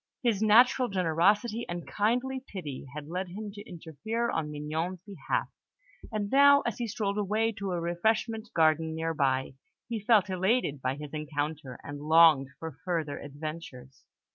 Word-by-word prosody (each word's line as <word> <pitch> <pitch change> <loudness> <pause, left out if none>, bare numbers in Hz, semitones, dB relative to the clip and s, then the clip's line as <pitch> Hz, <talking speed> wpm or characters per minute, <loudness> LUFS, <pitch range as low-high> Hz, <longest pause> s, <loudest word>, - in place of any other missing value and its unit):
His 225 -5 +1
natural 245 +4 +5
generosity 200 +5 +1
and 175 -1 -5
kindly 250 +5 0
pity 150 -9 -7
had 150 -1 -6
led 180 +3 -3
him 205 +4 -7
to 205 +1 -11
interfere 180 - -3
on 155 -2 -2
Mignon's 155 +5 -3
behalf; 195 -8 -2 0.6
and 210 -2 -2
now, 280 +1 +7
as 235 - -3
he 240 - -2
strolled 210 -1 -2
away 215 +3 +1
to 200 -1 -3
a 175 - -1
refreshment 220 +6 -1
garden 160 0 +3
near 165 0 -2
by, 135 -3 0 0.3
he 230 -2 -3
felt 210 -1 +4
elated 190 - 0
by 130 +1 -1
his 150 0 -9
encounter, 150 -3 -4
and 145 0 -7
longed 155 -3 +6
for 160 -4 -8
further 165 -5 -2
adventures. 145 -3 -8
175 Hz, 155 wpm, -29 LUFS, 150-215 Hz, 0.6 s, now